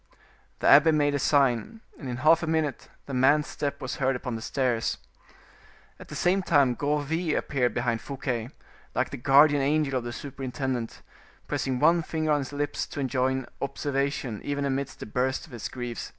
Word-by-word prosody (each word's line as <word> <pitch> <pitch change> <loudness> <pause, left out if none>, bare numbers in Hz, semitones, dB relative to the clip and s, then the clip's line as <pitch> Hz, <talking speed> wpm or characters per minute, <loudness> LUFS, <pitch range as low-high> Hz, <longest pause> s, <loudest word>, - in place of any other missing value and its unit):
The - - +2
abbe 150 +4 +7
made 145 -2 +2
a 145 - 0
sign, 140 - +1 0.2
and 135 - -6
in 120 - -3
half 165 +2 +6
a 165 - -3
minute 160 -3 -1 0.2
the 140 - -7
man's 140 +4 +4
step 140 -1 -4
was 130 - -5
heard 135 -1 +1
upon 125 0 -4
the 110 - -5
stairs. 125 -3 -1 1.0
At - - -11
the - - -8
same 185 +2 +2
time 140 -8 +3
Gourville 150 +5 -1
appeared 125 -4 0
behind 115 -2 0
Fouquet, 125 -4 -4 0.5
like - - 0
the - - -5
guardian 145 +3 +5
angel 140 -1 +1
of - - -9
the 120 - -5
superintendent, 130 -2 -4 0.4
pressing 130 -2 -1
one 165 +4 +4
finger 155 -1 -2
on 150 - +3
his 135 - -5
lips 145 0 -2
to - - -7
enjoin 130 0 0 0.2
observation 140 -5 -2
even 145 0 -2
amidst 140 0 -3
the - - -4
bursts 125 +4 -1
of 155 - -19
his 120 -3 -5
grief. 120 -2 -6
140 Hz, 180 wpm, -27 LUFS, 125-150 Hz, 1.0 s, abbe